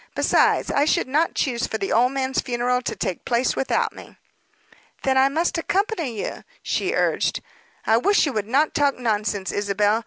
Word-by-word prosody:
Besides, - - +2
I 285 - +2
should 340 0 +1
not 305 +5 +1
choose 245 -5 -1
for 220 - -3
the 195 - -3
old 245 +3 +3
man's 265 -1 -1
funeral 250 0 -1
to - - -4
take 180 - -4
place 245 +1 0
without 270 - 0
me." - - -13 0.9
"Then 265 -1 +2
I 265 +1 +4
must 330 +4 0
accompany 345 - -1
you," - - -5 0.2
she 390 +5 -1
urged. - - 0 0.5
"I 220 - +4
wish 405 - +3
you 285 - -2
would 210 -2 -2
not 280 +6 +2
talk 285 -1 +1
nonsense, 210 -5 -1
Isabel. 205 +1 +1
255 Hz, 180 wpm, -23 LUFS, 220-295 Hz, 0.9 s, I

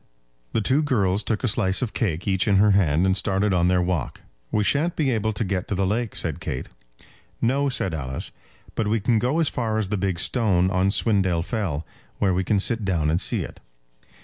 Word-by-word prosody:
The - - +1
two 130 +8 +2
girls 105 -9 +1
took 110 +1 -2
a - - +2
slice 100 0 +1
of 115 - -3
cake 90 -5 -2
each 95 +1 +1
in 100 - +3
her 105 +2 +5
hand, 90 -3 +3
and 95 0 +2
started 95 +1 +1
on 90 -1 +2
their 90 0 +2
walk. 90 -6 -2 0.3
"We 105 - +1
shan't 150 +10 +1
be 145 -4 +1
able 110 -2 0
to 110 - -2
get 95 -2 -2
to 100 - -2
the 95 +1 +1
lake," 110 +4 -1
said - - -3
Kate. - - -5 0.7
"No," 140 +4 +1
said 105 -8 -1
Alice; 65 -4 -4 0.4
"but 110 - -1
we 110 +2 +1
can 115 +2 +2
go 130 +8 0
as 165 - +3
far 115 -4 -1
as 105 -3 -1
the 105 - -1
big 95 -2 -1
stone 95 -3 +2
on 95 +1 +2
Swindale 95 -5 +2
Fell, 95 -11 -2 0.3
where 95 -3 +2
we 95 +1 0
can 105 +3 +1
sit 110 +3 0
down 85 -6 +1
and 85 - +1
see - - +1
it." - - -10
100 Hz, 220 wpm, -24 LUFS, 90-115 Hz, 0.7 s, her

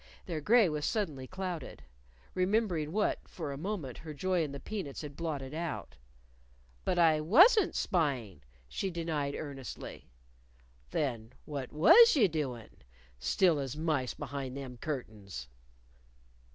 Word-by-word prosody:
Their 165 -4 -3
gray 225 +5 +5
was 150 -2 -2
suddenly 155 - -1
clouded 185 -4 -5 0.5
remembering 185 -5 +1
what, 210 +3 +1
for 155 -5 -5
a - - -4
moment, 165 - -4
her 155 -2 -8
joy 185 +3 +1
in 150 - -4
the 140 - -6
peanuts 160 -4 -5
had 145 -1 -7
blotted 145 -5 -4
out. 160 - -4 0.9
"But 180 - 0
I 160 -3 +5
wasn't 360 - +6
spying," 140 - 0 0.3
she 190 - -3
denied 160 -5 -2
earnestly. 140 - -7 0.8
"Then 120 -6 -2
what 140 -4 -5
was 390 - +8
you 230 -8 +5
doin'? 135 -9 -4 0.4
still 150 - +3
as 135 0 -4
mice 155 -6 0
behind 135 -2 -5
them 130 -3 -7
curtains." 105 - -6
155 Hz, 130 wpm, -32 LUFS, 135-180 Hz, 0.9 s, was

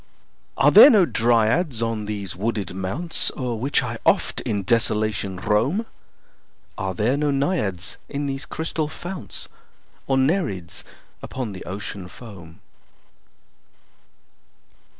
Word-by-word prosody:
Are 145 - +5
there 215 - +11
no 210 -8 +6
Dryads 120 +3 +2
on 115 -2 -2
these 100 -3 -4
wooded 100 -2 -2
mounts 95 - 0
O'er 125 -3 -2
which 130 +6 +1
I - - -4
oft - - +2
in 100 -2 -2
desolation 105 -3 0
roam? 115 - +1 0.9
Are 95 -1 -3
there 110 +8 +1
no 150 +1 0
Naiads 135 - -1
in 145 +1 -3
these 135 0 -3
crystal 160 -1 -2
founts? 175 +4 -7 0.6
Nor 135 - +3
Nereids 130 - 0 0.4
upon 125 -5 -5
the 95 -2 -8
Ocean 100 0 -6
foam? 90 -7 -12
115 Hz, 115 wpm, -23 LUFS, 100-145 Hz, 0.9 s, there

